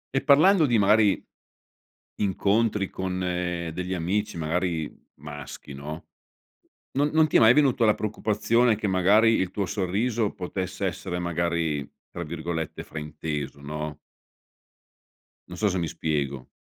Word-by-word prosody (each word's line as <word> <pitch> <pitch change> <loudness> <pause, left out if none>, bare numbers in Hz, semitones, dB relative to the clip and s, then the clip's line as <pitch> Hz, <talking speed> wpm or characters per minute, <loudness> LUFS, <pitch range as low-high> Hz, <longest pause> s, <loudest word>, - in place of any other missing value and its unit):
e 135 - +2
parlando 155 +5 +6
di 120 -3 +3
magari 105 0 +3 1.0
incontri 105 +1 +1
con 95 -1 -3
degli 90 0 -2
amici 100 +5 -1
magari 85 -1 -2 0.2
maschi, 75 -1 -9
no, 75 +4 -7 0.9
non 145 +2 +2
non 160 0 +5
ti - - +3
è - - +5
mai 115 +1 +7
venuto 130 -5 +3
la 105 - +5
preoccupazione 110 +2 +1
che 105 0 -3
magari 100 +5 +4
il 95 -3 -1
tuo 100 -1 -2
sorriso 105 +3 -1
potesse 95 +1 -4
essere 90 0 -4
magari, 85 -4 -1 0.2
tra 85 - -5
virgolette 80 0 -4
"frainteso", 75 -2 -5
no? 75 0 -5 1.5
Non 90 - -8
so 105 - +3
se 95 -1 -1
mi 85 - -1
spiego. 70 -5 -2
90 Hz, 130 wpm, -26 LUFS, 80-105 Hz, 1.5 s, mai